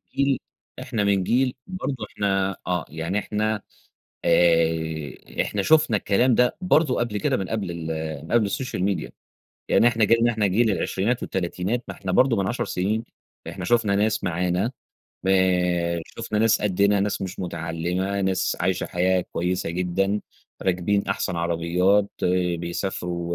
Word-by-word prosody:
جيل 140 -1 +2 0.4
إحنا 115 -5 -2
من 100 -2 +2
جيل 125 +4 +2
برضه 185 -7 -3 0.2
إحنا 95 -2 0
آه. 90 -1 0
يعني 80 +6 -2
إحنا، 105 0 -1 0.6
آآ 80 -3 +1
إحنا 105 - -1
شُفنا 150 -2 +4
الكلام 115 +5 +2
ده 125 0 +2
برضه 155 -7 +3
قبل 115 -3 -1
كده - - +1
من 95 - -4
قبل 100 -6 -2
ال 85 -1 -6 0.4
من - - -10
قبل 115 -3 +4
السوشيال 100 -2 -3
ميديا. 100 -1 -1 0.6
يعني 120 - +5
إحنا 115 -2 +2
جيلنا 115 +2 +4
إحنا 105 -2 +1
جيل 110 +3 +3
العشرينات 110 +6 -1
والتلاتينات 95 +6 -2
ما - - -5
إحنا 95 -2 -5
برضه 115 +4 +4
من 100 -1 0
10 120 - -1
سنين 105 +5 -1 0.5
إحنا - - -6
شُفنا 115 -4 +2
ناس 110 +1 +1
معانا، 90 +6 0 0.6
آآ 90 -2 +2
شُفنا 110 -2 -4
ناس 115 -1 +3
قدِّنا، 100 0 +2
ناس 100 0 -1
مش 95 0 -5
متعلّمة، 90 +3 -2
ناس 95 -1 0
عايشة 90 +1 0
حياة 90 +1 +1
كويسة 90 0 -1
جدًا، 95 +4 0 0.4
راكبين 95 +2 0
أحسن 95 -2 -1
عربيات، 85 +4 +2 0.5
بيسافروا 85 0 -3
95 Hz, 145 wpm, -24 LUFS, 90-110 Hz, 0.6 s, يعني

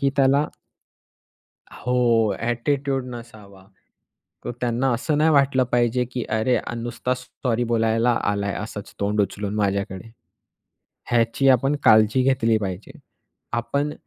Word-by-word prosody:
की 140 - +2
त्याला 140 +1 +4 1.3
हो 125 - -3 0.5
ॲटिट्यूड 135 +3 -1
नसावा. 105 -5 -12 0.8
तर - - -2
त्यांना 125 +2 0
असं 145 +5 -1
नाही 155 +2 +4
वाटलं 140 -3 +3
पाहिजे, 120 +1 +2
की 125 -2 -3
अरे 110 +3 +1
आ - - -5
नुसताच 120 +2 -3
सॉरी 125 -1 -2
बोलायला 115 +1 +2 0.2
आलाय 100 -1 -2
असच 105 -1 -7
तोंड 105 +1 +1
उचलून 100 +1 -3
माझ्याकडे. 100 0 -2 1.0
ह्याची 120 +3 +2
आपण 135 +3 +3
काळजी 110 +2 +5
घेतली 125 -4 +2
पाहिजे. 95 -1 -6 0.5
आपण 140 +5 -1
120 Hz, 120 wpm, -23 LUFS, 110-130 Hz, 1.3 s, काळजी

